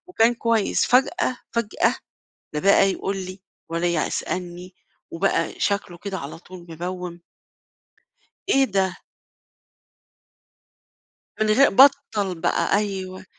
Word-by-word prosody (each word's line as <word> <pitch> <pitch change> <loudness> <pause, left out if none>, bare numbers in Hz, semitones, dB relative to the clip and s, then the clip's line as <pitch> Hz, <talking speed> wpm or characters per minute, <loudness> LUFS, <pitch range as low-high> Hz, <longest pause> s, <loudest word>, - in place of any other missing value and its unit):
وكان 240 -9 +2
كويس، 230 -3 +1
فجأة، 260 +2 +2 0.2
فجأة، 235 -3 +1 0.6
لا 150 - -1
بقى 195 +2 +4
يقُل 195 +1 -3
لي 185 0 -7 0.3
ولا 170 +1 -1 0.2
يسألني 180 0 -5 0.4
وبقى 195 +4 -1
شكله 185 -3 -1
كده 195 +1 -5
على 140 +3 -7
طول 180 0 -13
مبوِّم. 175 +1 -6 1.3
إيه 270 -5 +4
ده؟ 190 -5 0 2.5
من 215 - +3
غي 260 +7 +5
بطّل 220 -6 +4
بقى، 170 +4 +1
أيوه 190 -2 -4
195 Hz, 105 wpm, -23 LUFS, 180-220 Hz, 2.5 s, غي